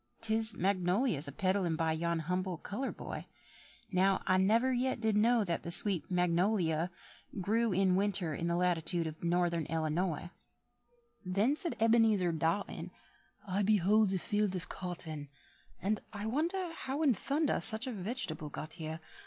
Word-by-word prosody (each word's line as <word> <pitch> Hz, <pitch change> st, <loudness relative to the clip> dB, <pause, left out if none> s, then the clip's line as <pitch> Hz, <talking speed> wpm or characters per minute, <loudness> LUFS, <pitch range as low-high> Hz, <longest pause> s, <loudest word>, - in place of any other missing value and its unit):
'Tis 220 Hz, -1 st, 0 dB
magnolias 185 Hz, -, +1 dB
a -, -, -5 dB
peddled 185 Hz, 0 st, 0 dB
by 165 Hz, -1 st, +1 dB
yon 170 Hz, +1 st, -1 dB
humble 180 Hz, +2 st, -2 dB
coloured 245 Hz, +10 st, -5 dB
boy: -, -, -7 dB, 0.6 s
Now, 190 Hz, +1 st, +2 dB
I 185 Hz, -, +3 dB
never 225 Hz, +7 st, +3 dB
yet 255 Hz, 0 st, 0 dB
did 220 Hz, -2 st, +1 dB
know 230 Hz, +2 st, +4 dB
That 170 Hz, -4 st, -2 dB
the -, -, -6 dB
sweet 175 Hz, -1 st, +4 dB
mag 180 Hz, -1 st, +1 dB
no 180 Hz, +6 st, +2 dB
li 170 Hz, -6 st, +1 dB
o 165 Hz, +3 st, -1 dB, 0.5 s
Grew 225 Hz, +4 st, +1 dB
in 185 Hz, 0 st, +3 dB
winter 195 Hz, -4 st, 0 dB
in 165 Hz, +3 st, -3 dB
the 170 Hz, -, +1 dB
latitude 175 Hz, -1 st, +1 dB
of 155 Hz, +1 st, -7 dB
Northern 170 Hz, -2 st, +1 dB
Ellanoy." 165 Hz, +1 st, -1 dB, 0.9 s
Then 200 Hz, +9 st, +1 dB
said 340 Hz, 0 st, -2 dB
Ebenezer 225 Hz, -5 st, +4 dB
Dotton, 165 Hz, +5 st, -2 dB, 0.6 s
"I 195 Hz, +2 st, 0 dB
behold 210 Hz, 0 st, +3 dB
a 190 Hz, -, +1 dB
field 205 Hz, 0 st, 0 dB
of 180 Hz, -, -5 dB
cotton, 160 Hz, -5 st, -5 dB, 0.5 s
And 205 Hz, +2 st, 0 dB
I 205 Hz, -1 st, -5 dB
wonder 335 Hz, -, -1 dB
how 285 Hz, -1 st, -3 dB
in 275 Hz, -5 st, +5 dB
thunder 285 Hz, -, 0 dB
such 220 Hz, +2 st, +4 dB
a 260 Hz, -, -3 dB
veg'table 185 Hz, -, -3 dB
got 155 Hz, +2 st, -7 dB
here. 160 Hz, 0 st, -6 dB
185 Hz, 160 wpm, -32 LUFS, 170-220 Hz, 0.9 s, in